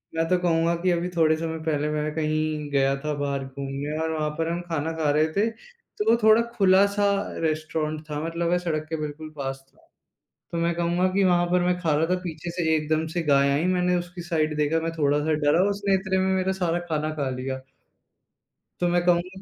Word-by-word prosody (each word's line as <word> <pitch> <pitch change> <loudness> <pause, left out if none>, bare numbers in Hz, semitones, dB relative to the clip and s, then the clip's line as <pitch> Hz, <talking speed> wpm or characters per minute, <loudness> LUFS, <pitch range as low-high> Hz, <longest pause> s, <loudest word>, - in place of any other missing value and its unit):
मैं 165 0 +1
तो 180 - +4
कहूँगा 170 -1 +2
कि 185 - +2
अभी 175 +1 0
थोड़े 160 -1 +4
समय 160 0 -4
पहले 150 -1 0
मैं 150 0 -2
कहीं 155 -1 -1
गया 135 -1 +2
था 150 0 -2
बाहर 140 -1 -1
घूमने 140 +2 -5
और 160 - -1
वहाँ 155 -1 -1
पर 165 - -1
हम 175 - -2
खाना 160 -1 -1
खा 155 -2 +1
रहे 155 +2 +3
थे। 210 +5 +2
तो 470 - -6
वो 230 - +5
थोड़ा 220 +1 +6
खुला-सा 200 +1 +4 0.4
रेस्टोरेंट 155 -1 -2
था 150 - -3
मतलब 170 +1 -2
मैं 175 - +3
सड़क 155 -3 -2
के 160 - -2
बिल्कुल 150 +1 -6
पास 135 -1 -4
था। - - -28 0.6
तो 170 - -3
मैं 170 0 +1
कहूँगा 175 +2 +1
कि 200 0 +3
वहाँ 175 -1 +3
पर 180 0 +3
मैं 180 0 +1
खा 160 -4 +1
रहा 155 +2 +2
था 185 - -1
पीछे 170 -1 -6
से 165 -2 0
एकदम 155 +1 0
से 175 - 0
गाय 140 -2 +3
आईं 145 +5 +1
मैंने 180 0 +2
उसकी 175 0 -5
साइड 155 -3 -1
देखा, 150 +2 +1
मैं 165 0 -2
थोड़ा-सा 150 +1 +2
डरा 160 +5 +4
उसने 200 -1 0
इतने 190 0 0
में 190 0 +2
मेरा 190 0 0
सारा 175 -3 0
खाना 155 -1 -1
खा 145 -3 -2
लिया। 130 +1 -4 1.2
तो 175 - +1
मैं 175 0 +2
कहूँगा 180 +2 +1
165 Hz, 215 wpm, -25 LUFS, 150-180 Hz, 1.2 s, थोड़ा